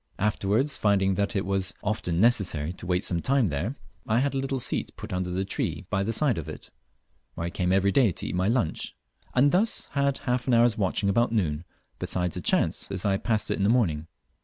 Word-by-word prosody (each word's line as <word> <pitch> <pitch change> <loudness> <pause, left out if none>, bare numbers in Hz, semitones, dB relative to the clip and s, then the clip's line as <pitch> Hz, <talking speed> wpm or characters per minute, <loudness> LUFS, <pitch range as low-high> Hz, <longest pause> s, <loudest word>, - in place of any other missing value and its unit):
Afterwards, 105 +6 0
finding 100 -2 +2
that 100 +3 -1
it 100 - 0
was 95 0 -1
often 95 -5 -1
necessary 90 -8 +2
to 90 - -9
wait 90 0 0
some 85 -2 0
time 130 -3 +2
there, 85 - -2 0.3
I 110 - +2
had 140 +3 +1
a 135 - 0
little 135 0 -2
seat - - -1
put - - -7
up - - 0
under 90 0 -2
a 95 - 0
tree 95 - -2
by 95 - +1
the 105 +3 -1
side 120 - +1
of 80 - -7
it, - - -9 0.6
where 85 - -3
I 85 - -3
came 90 0 0
every 95 +1 +3
day 120 +2 +4
to 90 - -6
eat - - -3
my 90 +1 +1
lunch, 115 -8 -1 0.4
and 140 +3 +5
thus 210 +5 +1
had 140 -1 +1
half 125 0 -2
an 125 - +4
hour's 115 -1 +4
watching 100 -1 0
about 120 +5 +2
noon, 85 -7 -1 0.3
besides 90 -2 -1
a - - -4
chance - - +1
as 95 +1 -3
I 100 -1 +2
passed 110 +1 0
it - - 0
in 100 - -1
the 100 - +3
morning. 85 -11 +1
100 Hz, 230 wpm, -26 LUFS, 90-120 Hz, 0.6 s, and